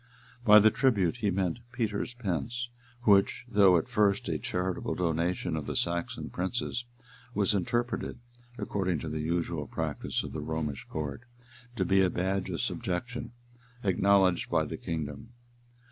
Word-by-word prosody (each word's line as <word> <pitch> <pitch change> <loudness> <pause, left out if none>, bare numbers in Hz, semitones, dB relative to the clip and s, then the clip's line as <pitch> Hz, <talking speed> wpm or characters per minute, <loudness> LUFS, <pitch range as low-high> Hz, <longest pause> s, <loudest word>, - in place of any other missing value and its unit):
By 105 -2 +9
the 110 +1 +7
tribute, 105 -8 +2
he 105 -4 0
meant 95 +1 0
Peter's 115 -1 -2
pence; 120 +3 -2 0.3
which, 100 +2 +4
though 100 -6 +6
at 80 - -1
first 100 -1 +2
a - - -1
charitable 90 0 -2
donation 85 0 0
of 75 - -4
the - - -3
Saxon 85 0 -1
princes, 120 +5 -2 0.5
was 100 -1 +3
interpreted, 120 +6 -1 0.4
according 95 -7 -1
to 80 - -4
the 80 0 -3
usual 85 -2 -1
practice - - -2
of - - -7
the - - -3
Romish 80 -3 -3
court, 75 +3 -4 0.5
to 95 - 0
be 95 +2 +4
a 95 - +4
badge 95 +2 -1
of 85 -5 -2
subjection 120 +8 -3 0.5
acknowledged 95 -2 +3
by - - +2
the - - -5
kingdom. 80 +9 -5
95 Hz, 145 wpm, -30 LUFS, 85-105 Hz, 0.5 s, By